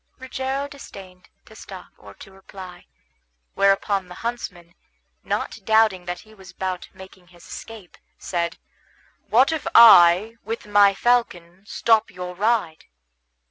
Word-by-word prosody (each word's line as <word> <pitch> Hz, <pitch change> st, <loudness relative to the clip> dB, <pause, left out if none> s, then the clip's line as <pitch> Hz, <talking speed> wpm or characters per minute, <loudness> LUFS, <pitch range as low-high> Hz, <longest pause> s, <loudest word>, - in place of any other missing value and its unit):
Rogero 265 Hz, +1 st, -4 dB
disdained 195 Hz, -10 st, -13 dB, 0.2 s
to -, -, -17 dB
stop -, -, -12 dB
or -, -, -15 dB
to 195 Hz, -, -14 dB
reply; 190 Hz, -2 st, -13 dB, 0.7 s
whereupon 195 Hz, -1 st, +1 dB
the 180 Hz, -, -11 dB
huntsman, 180 Hz, -8 st, -6 dB, 0.5 s
not -, -, -4 dB
doubting 220 Hz, -5 st, +2 dB
that 175 Hz, 0 st, -6 dB
he 220 Hz, -, -19 dB
was 190 Hz, -3 st, -16 dB
about 185 Hz, 0 st, -5 dB
making 190 Hz, -1 st, -16 dB
his 175 Hz, 0 st, -19 dB
escape, 220 Hz, -6 st, -11 dB, 0.2 s
said, 170 Hz, -2 st, -4 dB, 0.7 s
"What 245 Hz, +8 st, +3 dB
if 320 Hz, -2 st, -4 dB
I, 215 Hz, 0 st, +7 dB
with 225 Hz, -1 st, -6 dB
my 205 Hz, -1 st, +4 dB
falcon, 195 Hz, -6 st, -1 dB
stop 225 Hz, +1 st, +1 dB
your 180 Hz, -1 st, -8 dB
ride?" 205 Hz, -4 st, -1 dB
195 Hz, 130 wpm, -22 LUFS, 180-225 Hz, 0.7 s, I